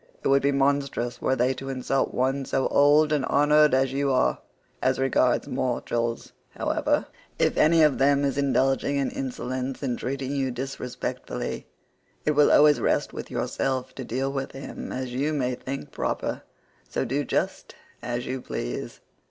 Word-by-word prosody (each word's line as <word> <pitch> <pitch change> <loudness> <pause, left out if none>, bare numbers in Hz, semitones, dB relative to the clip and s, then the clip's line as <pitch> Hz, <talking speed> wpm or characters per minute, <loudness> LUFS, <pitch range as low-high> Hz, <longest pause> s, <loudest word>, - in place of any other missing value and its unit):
It - - +1
would 135 0 +4
be 140 - +2
monstrous 140 -3 0
were 130 - +1
they 125 +1 +2
to 135 +1 -7
insult 135 +1 -1
one 135 +2 0
so 135 0 0
old 150 +2 +5
and 145 -3 +1
honoured 150 0 +4
as 135 0 +1
you 140 0 +1
are. 130 - +2 0.4
As 130 0 +2
regards 130 -2 +2
mortals, 120 -2 -2 0.2
however, - - 0 0.3
if - - +2
any 160 +1 +5
of 150 -3 +3
them 140 +1 +3
is 140 - 0
indulging 135 0 +1
in 140 -1 0
insolence 130 0 -4
and 125 -3 -2
treating 135 +1 -3
you 135 -1 0
disrespectfully, 125 0 -5 0.6
it 150 - +3
will 150 0 +4
always 150 0 +6
rest - - 0
with - - -7
yourself 130 -1 -2
to 135 - -6
deal 130 +3 -2
with 135 -1 -4
him 135 - -7
as 130 -1 -4
you 145 +5 0
may 130 -4 0
think 135 +2 -6
proper, - - -2 0.5
so - - -1
do 135 +4 -1
just - - -2 0.3
as 120 0 -3
you 130 0 -4
please." - - -5
135 Hz, 165 wpm, -26 LUFS, 130-140 Hz, 0.6 s, always